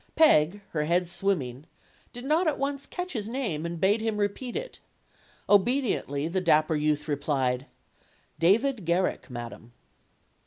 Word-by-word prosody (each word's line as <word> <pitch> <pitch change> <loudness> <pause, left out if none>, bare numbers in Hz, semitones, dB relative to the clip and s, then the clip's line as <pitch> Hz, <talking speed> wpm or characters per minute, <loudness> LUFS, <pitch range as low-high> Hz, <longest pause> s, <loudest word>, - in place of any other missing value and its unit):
Peg, 200 - +5
her 150 -2 -1
head 175 +2 +1
swimming, 155 -8 -2 0.4
did 245 +1 -8
not 320 +5 +2
at 305 - +1
once 280 0 -3
catch 360 0 -5
his 220 -3 -4
name 210 - -2
and 170 0 -5
bade 205 +5 +3
him 220 -1 -1
repeat 210 +4 -2
it. - - -5 0.7
Obediently, 205 - +2
the 185 +3 -1
dapper 155 -2 +3
youth 150 0 0
replied: 135 -3 -1 0.7
"David 220 +7 +3
Garrick, 175 -1 0
madam." 120 -1 -8
185 Hz, 140 wpm, -27 LUFS, 150-245 Hz, 0.7 s, Peg